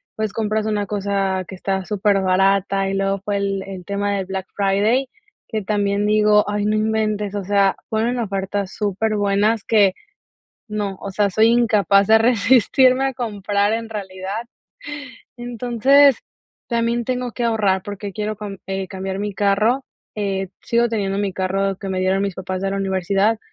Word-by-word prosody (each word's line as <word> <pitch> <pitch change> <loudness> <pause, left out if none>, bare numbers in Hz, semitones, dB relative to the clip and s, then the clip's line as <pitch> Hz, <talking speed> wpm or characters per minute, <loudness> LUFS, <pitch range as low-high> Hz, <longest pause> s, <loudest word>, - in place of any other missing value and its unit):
pues, 215 -1 -2
compras 215 0 -1
una 210 -2 -1
cosa 195 -2 -1
que 190 - -7
está 190 +1 -2
superbarata 195 0 +2
y 195 - -2
luego 195 0 0
fue 205 -1 0
el 195 -1 -1
el 190 -2 -7
tema 200 +2 -2
de 195 - -1
Black 190 0 -5
Friday, 210 +7 +1 0.4
que 215 -2 -3
también 205 0 0
digo: 210 0 +4
"Ay, 205 0 -1
no 210 +1 +1
inventes", 215 -2 -1
o 200 - -2
sea, 200 0 +2
ponen 230 +3 0
ofertas 195 -2 -2
superbuenas 210 +1 0
que 205 -4 +4 0.8
no 205 -2 -3
o 200 - -6
sea, 200 +1 +1
soy 220 +4 +4
incapaz 215 -4 +3
de 220 - +7
resistirme 250 +3 +4
a 270 - -2
comprar 205 -3 -1
en 230 0 -2
realidad. 200 +1 -5 0.9
Entonces, 245 +3 +3 0.5
también 235 0 0
tengo 250 0 -2
que 240 - -3
ahorrar 205 -5 +1
porque 205 0 -6
quiero 210 +1 -3
com 200 -1 -7
eh 195 -1 -3
cambiar 190 0 -5
mi 205 0 -3
carro. 210 +7 +2 0.3
Eh, 195 -2 -2
sigo 235 0 +2
teniendo 200 -3 -1
mi 200 -1 -1
carro 195 +1 -1
que 195 - -6
me 185 -1 -1
dieron 190 +1 +1
mis 200 -2 -2
papás 185 0 -4
de 195 - 0
la 195 - -2
universidad, 195 +3 +1
205 Hz, 165 wpm, -20 LUFS, 195-220 Hz, 0.9 s, de